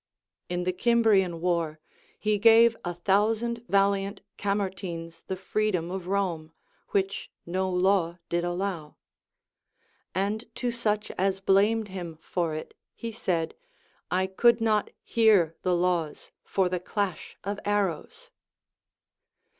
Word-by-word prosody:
In 180 0 -1
the 185 +1 0
Cimbrian 195 -5 +3
war, 170 -3 0 0.4
he 210 -1 0
gave 230 +1 +7
a 175 - -2
thousand 220 +6 +1
valiant 200 0 +1
Camertines 190 -5 -3
the 190 - -2
freedom 185 -2 -1
of 185 -2 -5
Rome, 175 -5 -1 0.4
which 195 0 -1 0.2
no 185 +2 -1
law 180 -2 +2
did 170 0 0
allow; 175 -3 -3 1.2
and 205 +4 -1
to 245 -1 -1
such 215 -3 -1
as 195 0 +1
blamed 205 +3 +3
him 175 -4 -6
for 165 -1 -2
it 155 - -7 0.2
he 230 - -5
said, 180 -8 -1 0.6
I 185 +1 +1
could 230 +5 +4
not 215 -2 +2
hear 205 -8 +4
the 180 -1 +2
laws 175 -3 -1
for 190 -2 +1
the 180 0 -1
clash 195 0 -3
of 200 +1 -3
arrows. 200 -6 -2
190 Hz, 120 wpm, -27 LUFS, 175-210 Hz, 1.2 s, gave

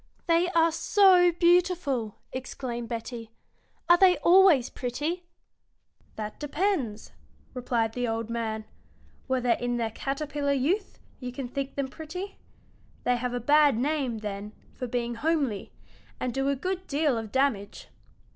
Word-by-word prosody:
"They 340 +1 +3
are 330 0 +5
so 360 +1 +5
beautiful!" 340 - +2 0.2
exclaimed 245 -2 -5
Betty. 230 -1 -5 0.6
"Are 345 0 +6
they 370 -3 +6
always 345 -8 +6
pretty?" 300 +8 -3 0.9
"That 210 -1 -6
depends," 295 - -1 0.4
replied 240 -3 -1
the 245 0 -1
old 225 0 -2
man, 225 -2 -3 0.6
"whether 255 -2 +1
in 245 +1 0
their 225 -2 -1
caterpillar 280 +3 -2
youth 340 +10 0 0.2
you 250 -1 -5
think 270 +2 -5
them 275 -1 -1
pretty. 350 +8 -7 0.6
They 245 0 +2
have 245 0 -3
a - - -1
bad 290 0 +4
name, 270 -2 0
then, 210 0 -6 0.2
for 250 - -5
being 240 0 -2
homely, 275 -5 -1 0.5
and 250 -2 -2
do 270 +2 0
a 280 - +1
good 370 +6 -4
deal 290 -2 +1
of 225 -2 -5
damage." 250 -7 -1
265 Hz, 135 wpm, -27 LUFS, 235-325 Hz, 0.9 s, Are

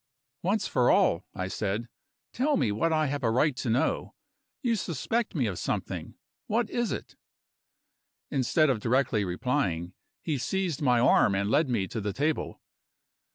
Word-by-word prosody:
"Once 195 +2 0
for 125 -2 +2
all," 85 +3 +3
I 90 0 -2
said, 105 +4 -2 0.5
"tell 290 +4 +1
me 120 -6 +1
what 165 +11 +1
I 155 -1 +2
have 145 -1 -2
a 115 - +3
right 130 +5 +2
to 120 - -2
know. 120 +4 0 0.5
You 235 -2 +2
suspect 205 - -2
me 135 -6 +1
of 100 -5 -3
something. - - -3 0.3
What 230 +1 0
is 240 -1 0
it?" - - -6 1.2
Instead 140 +2 +3
of 120 - -1
directly 120 -2 +1
replying, 90 - -1 0.3
he 150 -5 -1
seized 180 0 -1
my 125 -4 +3
arm 115 -4 +4
and 100 +2 0
led 145 0 +3
me 100 -6 0
to 115 - -4
the 100 -1 -2
table. 150 +7 -1
130 Hz, 160 wpm, -28 LUFS, 105-160 Hz, 1.2 s, arm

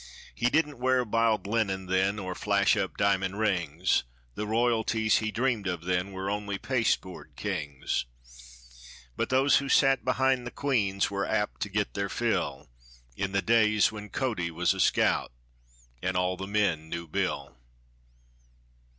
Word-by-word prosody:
He 120 +1 +1
didn't 150 -2 0
wear 130 0 +2
biled 110 -2 +1
linen 100 -3 -1
then, 95 +2 +1
or 95 -3 -4
flash - - +2
up - - -2
diamond 100 -1 +1
rings; 90 -5 +1 0.3
The 105 - -4
royalties 110 -1 +2
he 110 - -2
dreamed 115 -3 -1
of 90 -2 -3
then 90 +1 0
were 95 0 -5
only 100 0 -2
pasteboard 115 -7 -2
kings; 75 -13 -3 1.1
But - - -2
those 135 +2 +4
who 140 0 -2
sat 135 -1 +4
behind 130 -1 +1
the - - -3
queens 105 -9 0
were 100 0 -1
apt 105 -1 -1
to 100 - -2
get 105 +1 -1
their 100 -1 -2
fill, 95 - -1 0.5
In 100 +6 -2
the 100 0 0
days 110 -2 +4
when 105 -1 -8
Cody 110 -11 -2
was 85 +3 +1
a 95 - -7
scout, - - +2 0.7
and 95 0 -1
all 90 0 +1
the 95 +1 -6
men 100 -7 0
knew 85 0 -5
Bill. 75 - -2
100 Hz, 150 wpm, -28 LUFS, 95-115 Hz, 1.1 s, those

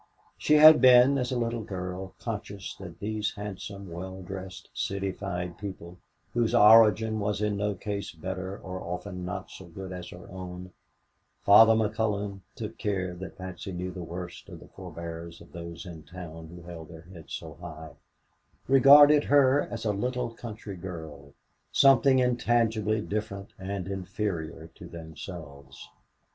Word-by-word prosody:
She 150 - +3
had 155 +1 +9
been, 130 +2 +7
as 125 0 -2
a 125 - 0
little 115 -1 -1
girl, 95 -2 -6
conscious 100 -4 -5
that 85 -3 -10
these 110 +4 -2
handsome, 100 -2 -7
well 95 +2 -7
dressed, 95 0 -8
citified 95 -2 -3
people, 90 -3 -8 0.3
whose 120 -2 +1
origin 110 0 +6
was 105 0 -1
in 105 -1 0
no 105 0 -1
case 100 +2 -4
better 95 +3 -5
and - - -14
often 90 0 -5
not 90 +2 -5
so 95 - -10
good 95 +2 -8
as 90 -1 -7
her 90 - -11
own 90 -1 -8 0.7
Father 110 +3 +8
McCullon 105 -2 -1 0.2
took 110 0 -7
care 95 -4 -1
that 95 +2 -9
Patsy 95 0 -7
knew 90 +1 -4
the 90 0 -7
worst 85 +1 -7
of - - -10
the - - -15
forebears 85 0 -8
of - - -16
those 85 0 -8
in 85 -3 -9
town 80 +1 -9
who 85 +1 -12
held 85 -2 -9
their 80 -1 -11
heads 85 -2 -9
so 80 -2 -8
high 80 -2 -8 0.8
regarded 145 +3 +8
her 140 0 +5
as 115 -1 -5
a 105 - +2
little 125 +3 -2
country 110 -4 -8
girl, 80 -6 -9 0.4
something 135 0 +6
intangibly 115 -4 +2
different 100 -2 -4
and 95 -1 -4
inferior 90 -4 -4
to 85 - -11
themselves. 80 -3 -10
95 Hz, 150 wpm, -28 LUFS, 90-110 Hz, 0.8 s, had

